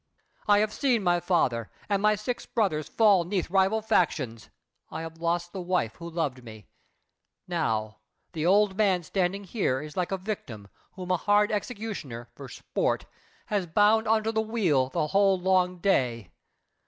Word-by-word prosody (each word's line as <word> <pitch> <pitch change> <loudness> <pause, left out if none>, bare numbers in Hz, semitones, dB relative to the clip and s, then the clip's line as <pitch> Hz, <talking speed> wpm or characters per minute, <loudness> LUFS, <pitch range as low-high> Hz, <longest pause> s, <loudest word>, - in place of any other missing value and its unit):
I 205 -1 +6
have 210 +1 +1
seen 250 -7 +1
my 175 -1 +3
father 145 - 0 0.2
And 200 -2 0
my 210 0 +4
six 210 +4 -4
brothers 170 - -1
fall 205 -5 +4
'neath 180 0 -2
rival 195 +3 +2
factions; 130 - 0 0.4
I - - -5
have 165 0 -9
lost 175 +1 -1
the 190 - -4
wife 175 -11 -1
who 170 0 -7
loved 150 -7 -3
me. 110 -4 -12 0.8
Now 110 -12 -2 0.3
The 155 - -3
old 195 +2 +3
man 195 -4 +2
standing 190 +3 -1
here 185 - -1
is 150 +1 -9
like 180 0 -1
a 195 - 0
victim 145 - -6 0.2
Whom 185 -1 -5
a 180 - +3
hard 205 +3 +2
executioner, 205 - -5
for 135 +1 -10
sport, - - -2 0.4
Has 200 -4 -1
bound 210 +6 +3
unto 220 0 +2
the 220 0 +1
wheel 185 - +1
the 150 - -1
whole 195 +3 +3
long 180 0 +2
day. 125 - 0
180 Hz, 165 wpm, -27 LUFS, 150-205 Hz, 0.8 s, I